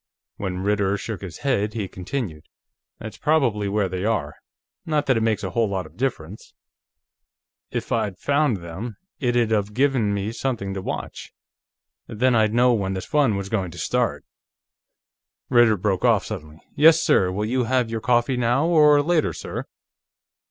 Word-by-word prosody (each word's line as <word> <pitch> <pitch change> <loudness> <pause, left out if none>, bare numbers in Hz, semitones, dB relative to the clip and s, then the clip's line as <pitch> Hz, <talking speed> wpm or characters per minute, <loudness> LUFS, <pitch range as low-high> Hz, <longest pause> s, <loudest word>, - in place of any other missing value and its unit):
When 90 -2 -4
Ritter 100 -1 +1
shook 105 0 -6
his 90 -5 -8
head, 110 -5 0
he 105 -4 -2
continued: 90 - -5 0.5
"That's 110 0 -9
probably 120 -10 +1
where 100 -1 +1
they 90 0 -4
are. 100 -10 -1 0.5
Not 150 -2 0
that 130 - +3
it 115 - +1
makes 110 -1 0
a 95 - -3
whole 115 +2 +1
lot 95 -2 -2
of - - -15
difference." 105 -7 -4 1.1
"If - - -5
I'd 100 -3 -1
found 145 -3 +1
them, 95 +7 -7 0.2
it'd 120 -4 +1
of 105 -1 0
given 130 -6 +2
me 100 +1 -2
something 115 -6 -3
to 95 - -4
watch; - - -6 0.8
then 125 +4 +1
I'd 110 -2 +3
know 120 +2 +4
when 95 -4 -1
the 95 - -3
fun 140 -6 +1
was 100 0 -3
going 100 -4 -1
to - - -11
start." - - -1 1.2
Ritter 120 -3 +5
broke 95 +1 -1
off 115 -5 +3
suddenly. 80 -7 -8
"Yes, 160 +2 +6
sir. 90 -1 +3
Will 105 +3 -2
you 125 +2 0
have 125 -1 0
your 115 -1 -3
coffee 125 +2 +2
now, 125 +5 +2
or 150 -3 +5
later, 165 0 +1
sir?" - - -6
110 Hz, 165 wpm, -23 LUFS, 100-125 Hz, 1.2 s, Yes